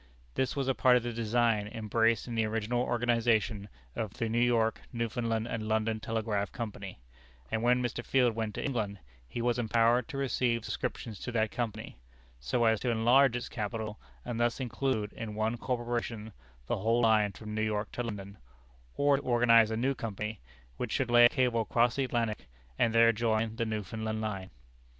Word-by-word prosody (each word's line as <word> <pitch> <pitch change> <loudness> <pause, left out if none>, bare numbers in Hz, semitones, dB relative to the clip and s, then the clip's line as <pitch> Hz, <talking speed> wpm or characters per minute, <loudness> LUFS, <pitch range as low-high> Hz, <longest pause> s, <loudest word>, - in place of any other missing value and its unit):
This 130 - -1
was 135 -2 -1
a 135 - +3
part 125 -1 +5
of 120 - -2
the 120 0 -3
design 115 -2 +1
embraced 115 +1 +1
in 120 - -5
the 115 -1 +1
original 110 +2 -1
organization 115 -4 +1 0.3
of 110 -3 -4
the 115 - -2
New 115 +1 +1
York, 115 -2 +2
Newfoundland, 115 -1 -2
and 110 -2 -4
London 110 0 0
Telegraph 110 -3 -2
Company; 100 - -6 0.5
and 110 - 0
when 125 +1 +3
Mr. 120 0 -3
Field 125 -3 +2
went 110 -1 -3
to - - -3
England, 110 -7 -2 0.3
he 115 - -4
was 120 0 +1
empowered 115 +1 +2
to 155 -4 -6
receive 125 -4 0
subscriptions 110 -5 -4
to - - -5
that 110 -2 +1
Company, 115 - -4 0.4
so 60 - 0
as 110 -1 +3
to 125 - -1
enlarge 120 +3 +4
its 120 0 -3
capital, 110 0 -4 0.3
and 120 -2 -3
thus 120 +2 +1
include 125 -4 -2
in 110 -2 -6
one 110 +2 0
corporation 120 -3 -3 0.3
the - - -1
whole 115 +4 +2
line 110 -3 +3
from 105 +2 -8
New 110 - -1
York 105 -1 -1
to - - -4
London; 100 -4 -6 0.6
or 145 -1 +4
to - - -4
organize 115 -2 +5
a 110 - -2
new 130 +4 +1
company, 105 -3 -5 0.4
which 125 - -3
should 130 -4 0
lay 120 0 +8
a - - +7
cable 125 -3 +1
across 120 +1 +2
the 135 - +2
Atlantic, 115 - -2 0.3
and 115 - +3
there 115 0 +7
join 110 0 0
the 115 - -1
Newfoundland 110 +1 -3
line. 100 -4 -4
115 Hz, 185 wpm, -30 LUFS, 110-120 Hz, 0.6 s, lay